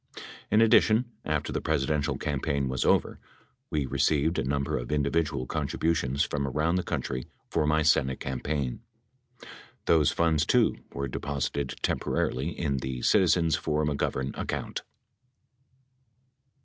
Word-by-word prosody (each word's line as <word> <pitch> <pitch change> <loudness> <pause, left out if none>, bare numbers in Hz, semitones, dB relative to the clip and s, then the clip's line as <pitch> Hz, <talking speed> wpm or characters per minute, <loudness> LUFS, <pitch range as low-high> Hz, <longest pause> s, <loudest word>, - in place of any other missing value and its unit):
In 105 +2 +4
addition, 115 +1 +4
after - - -1
the - - -1
Presidential 75 -1 0
campaign 70 -1 -1
was 65 -1 -1
over, - - +2 0.5
we 75 -2 0
received 75 +4 +1
a - - 0
number 70 +1 -1
of - - -6
individual 75 -2 0
contributions 75 -1 0
from 70 -1 -2
around 75 +6 +1
the - - +1
country 65 -7 -3 0.2
for 75 -2 +1
my 75 +1 +3
Senate 65 -3 +2
campaign. 65 - -3 1.0
Those 80 -3 +4
funds, 80 -2 +2
too, 120 +5 +3
were 70 0 -3
deposited 70 0 -3
temporarily 65 +6 0
in 70 -5 -2
the 65 -1 -4
Citizens 85 -5 +4
for 75 +1 0
McGovern 70 -2 -1
account. - - -4
75 Hz, 125 wpm, -28 LUFS, 70-80 Hz, 1.0 s, In